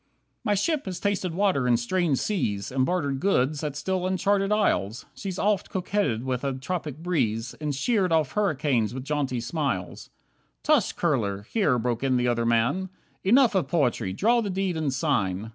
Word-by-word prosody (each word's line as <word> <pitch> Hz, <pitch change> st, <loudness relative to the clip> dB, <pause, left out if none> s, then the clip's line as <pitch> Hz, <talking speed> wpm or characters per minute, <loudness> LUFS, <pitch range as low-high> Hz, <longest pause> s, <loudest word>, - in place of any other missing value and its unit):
10 -, -, -45 dB, 0.4 s
My 210 Hz, -2 st, +2 dB
ship 300 Hz, -, 0 dB
has 185 Hz, -2 st, -4 dB
tasted 190 Hz, -4 st, -1 dB
water 185 Hz, -10 st, +2 dB
in 120 Hz, -1 st, +4 dB
strange 155 Hz, +4 st, 0 dB
seas, 105 Hz, -, -1 dB
And 130 Hz, 0 st, +1 dB
bartered 145 Hz, -7 st, -1 dB
goods 150 Hz, -4 st, +1 dB
at 150 Hz, -2 st, -3 dB
still 185 Hz, +5 st, -1 dB
uncharted 195 Hz, +1 st, +1 dB
isles. 125 Hz, -, +1 dB
She's 190 Hz, -2 st, -5 dB
oft 205 Hz, -1 st, +1 dB
coquetted 185 Hz, -, -1 dB
with 130 Hz, -1 st, -2 dB
a 135 Hz, -1 st, 0 dB
tropic 150 Hz, +1 st, -4 dB
breeze, 120 Hz, -10 st, -1 dB
And 150 Hz, -2 st, -2 dB
sheered 195 Hz, -, +1 dB
off 160 Hz, -4 st, +2 dB
hurricanes 140 Hz, -, 0 dB
with 130 Hz, 0 st, -6 dB
jaunty 140 Hz, -4 st, -1 dB
smiles." 140 Hz, +4 st, -3 dB, 0.5 s
"Tush, 295 Hz, -8 st, +3 dB
Kurler," 105 Hz, -, -1 dB
here 150 Hz, -, +1 dB
broke 120 Hz, +1 st, -1 dB
in 130 Hz, -2 st, +2 dB
the 125 Hz, 0 st, +1 dB
other 115 Hz, -1 st, +1 dB
man, 125 Hz, +12 st, +1 dB, 0.3 s
"Enough 240 Hz, +4 st, +5 dB
of 190 Hz, -3 st, +1 dB
poetry, 125 Hz, -, 0 dB
draw 235 Hz, -, +2 dB
the 210 Hz, -, -3 dB
deed 190 Hz, -1 st, -1 dB
and 155 Hz, -3 st, -1 dB
sign." 110 Hz, -, -1 dB
150 Hz, 180 wpm, -26 LUFS, 125-190 Hz, 0.5 s, Enough